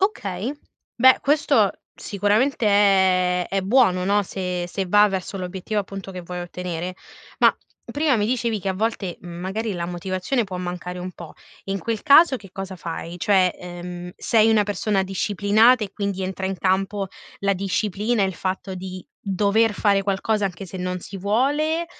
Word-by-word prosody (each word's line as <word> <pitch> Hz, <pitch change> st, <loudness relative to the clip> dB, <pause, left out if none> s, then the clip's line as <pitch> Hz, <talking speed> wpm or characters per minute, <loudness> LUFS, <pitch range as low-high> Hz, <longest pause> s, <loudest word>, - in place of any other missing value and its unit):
Okay. 230 Hz, -, -1 dB, 0.4 s
Beh 260 Hz, +1 st, +6 dB
questo 295 Hz, +2 st, +3 dB, 0.2 s
sicuramente 215 Hz, +5 st, 0 dB
è 190 Hz, -3 st, +3 dB
è 195 Hz, 0 st, 0 dB
buono 190 Hz, -4 st, +3 dB
no. 205 Hz, +1 st, +3 dB
Se 180 Hz, -2 st, -3 dB
se 190 Hz, +1 st, -3 dB
va 205 Hz, +3 st, +6 dB
verso 195 Hz, 0 st, -4 dB
l'obiettivo 190 Hz, +3 st, -3 dB
appunto 195 Hz, -1 st, -7 dB
che 185 Hz, -, -6 dB
vuoi 180 Hz, 0 st, -6 dB
ottenere. 180 Hz, 0 st, -5 dB, 0.4 s
Ma, -, -, +5 dB, 0.3 s
prima 290 Hz, -4 st, +1 dB
mi 210 Hz, -, +1 dB
dicevi 235 Hz, -2 st, 0 dB
che 195 Hz, -, -3 dB
a -, -, +1 dB
volte, 205 Hz, -3 st, -2 dB
mhmm, 175 Hz, -1 st, -9 dB
magari 210 Hz, +4 st, -3 dB
la 170 Hz, -1 st, -3 dB
motivazione 185 Hz, +7 st, -2 dB
può 190 Hz, -2 st, -6 dB
mancare 180 Hz, 0 st, -5 dB
un 180 Hz, +1 st, -6 dB
po'. 170 Hz, -2 st, -11 dB, 0.3 s
In 195 Hz, 0 st, -2 dB
quel 225 Hz, 0 st, -3 dB
caso 285 Hz, -1 st, +6 dB
che 195 Hz, -4 st, -14 dB
cosa 190 Hz, 0 st, -6 dB
fai? 170 Hz, +1 st, -6 dB
Cioè, 185 Hz, -2 st, +3 dB
ehm, 175 Hz, 0 st, -7 dB
sei 225 Hz, -1 st, +3 dB
una 215 Hz, -2 st, +4 dB
persona 205 Hz, 0 st, 0 dB
disciplinata, 205 Hz, +5 st, +3 dB
e 195 Hz, -, -9 dB
quindi 200 Hz, -2 st, -3 dB
entra 190 Hz, 0 st, -3 dB
in 190 Hz, 0 st, -3 dB
campo 195 Hz, +2 st, 0 dB, 0.3 s
la 200 Hz, 0 st, +2 dB
disciplina, 200 Hz, +3 st, 0 dB
il 190 Hz, -2 st, -2 dB
fatto 190 Hz, +1 st, -3 dB
di 185 Hz, 0 st, -7 dB, 0.2 s
dover 205 Hz, +3 st, +2 dB
fare 200 Hz, 0 st, +2 dB
qualcosa 205 Hz, +2 st, 0 dB
anche 190 Hz, 0 st, -4 dB
se 190 Hz, -, -8 dB
non 180 Hz, 0 st, -3 dB
si 195 Hz, -, -9 dB
vuole, 290 Hz, -, +1 dB
195 Hz, 170 wpm, -23 LUFS, 180-215 Hz, 0.4 s, Beh